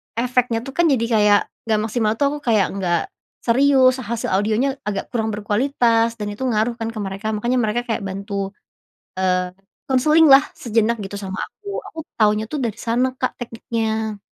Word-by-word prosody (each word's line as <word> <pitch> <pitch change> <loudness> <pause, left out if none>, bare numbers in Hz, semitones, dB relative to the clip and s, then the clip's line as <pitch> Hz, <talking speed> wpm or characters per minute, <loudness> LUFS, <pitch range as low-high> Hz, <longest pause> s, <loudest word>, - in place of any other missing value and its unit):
efeknya 245 0 +1
tuh 270 - -7
kan 345 -1 +4
jadi 250 -6 +2
kayak 210 -2 +5 0.3
nggak 215 -1 +2
maksimal 220 -1 0
tuh 285 - +1
aku 295 - -4
kayak 215 -5 +3
nggak, 175 -4 0 0.4
serius 260 +1 +4
hasil 230 -3 -3
audionya 220 +8 +1
agak 200 -2 -3
kurang 225 -3 -1
berkualitas 230 +1 +1
dan 205 0 -3
itu 215 +6 -6
ngaruh 230 0 +1
kan 225 - -2
ke 215 - -6
mereka 195 +2 -5
makanya 240 +4 0
mereka 230 +1 0
kayak 225 - -1
bantu, 195 +1 -4 0.7
eee, 180 -1 +1 0.4
konseling 305 +5 +5
lah 270 - +10 0.2
sejenak 230 0 +1
gitu 195 +1 -6
sama 190 -1 -5
aku 410 -1 -15 0.2
aku - - -12 0.2
tahunya 215 -1 +3
tuh 300 - -1
dari 225 -1 -3
sana 250 +3 0
Kak - - 0
tekniknya. 220 -2 -3
225 Hz, 170 wpm, -21 LUFS, 210-250 Hz, 0.7 s, lah